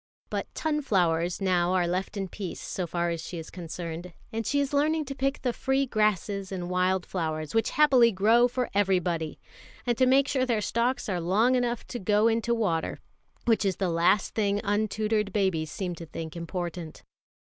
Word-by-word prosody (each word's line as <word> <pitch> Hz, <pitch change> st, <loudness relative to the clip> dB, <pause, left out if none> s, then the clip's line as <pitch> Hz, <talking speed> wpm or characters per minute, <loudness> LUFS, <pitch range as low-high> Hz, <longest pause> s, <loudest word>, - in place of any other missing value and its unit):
But -, -, -2 dB
"tunflowers" 180 Hz, -, +1 dB
now 180 Hz, -2 st, +2 dB
are 180 Hz, -1 st, +2 dB
left 185 Hz, +4 st, -2 dB
in 195 Hz, -1 st, -2 dB
peace 190 Hz, -1 st, -6 dB
so 180 Hz, -2 st, -4 dB
far 170 Hz, +1 st, -1 dB
as 165 Hz, -1 st, -3 dB
she 170 Hz, +2 st, -6 dB
is 160 Hz, -, -8 dB
concerned; 170 Hz, 0 st, -6 dB, 0.2 s
and 225 Hz, 0 st, -2 dB
she 285 Hz, -, +2 dB
is 280 Hz, 0 st, -1 dB
learning 305 Hz, +2 st, +2 dB
to 275 Hz, -, -5 dB
pick 275 Hz, +1 st, -2 dB
the 250 Hz, -2 st, +1 dB
free 265 Hz, +3 st, +1 dB
grasses 205 Hz, -4 st, 0 dB
and 180 Hz, -2 st, -4 dB
wild 180 Hz, 0 st, +1 dB
flowers, 155 Hz, -4 st, -3 dB
which 225 Hz, 0 st, +2 dB
happily 260 Hz, -6 st, +5 dB
grow 225 Hz, +5 st, +4 dB
for 250 Hz, 0 st, -2 dB
everybody, 180 Hz, -5 st, 0 dB, 0.5 s
and 240 Hz, -1 st, +1 dB
to 255 Hz, -, +5 dB
make 270 Hz, +2 st, +4 dB
sure 260 Hz, -2 st, +1 dB
their 240 Hz, -4 st, +1 dB
stalks 235 Hz, +5 st, 0 dB
are 180 Hz, -4 st, -1 dB
long 210 Hz, +9 st, +3 dB
enough 245 Hz, -2 st, 0 dB
to 245 Hz, -, -6 dB
go 210 Hz, +3 st, +3 dB
into 230 Hz, +1 st, +1 dB
water, 175 Hz, -8 st, -1 dB, 0.5 s
which 225 Hz, -2 st, +3 dB
is 195 Hz, -3 st, +1 dB
the 190 Hz, 0 st, -1 dB
last 175 Hz, +4 st, +2 dB
thing 205 Hz, -2 st, +1 dB
untutored 210 Hz, 0 st, 0 dB
babies 185 Hz, -6 st, 0 dB
seem 180 Hz, +2 st, -3 dB
to 165 Hz, 0 st, -9 dB
think 160 Hz, +1 st, -7 dB
important. 170 Hz, -1 st, -5 dB
200 Hz, 185 wpm, -27 LUFS, 175-235 Hz, 0.5 s, happily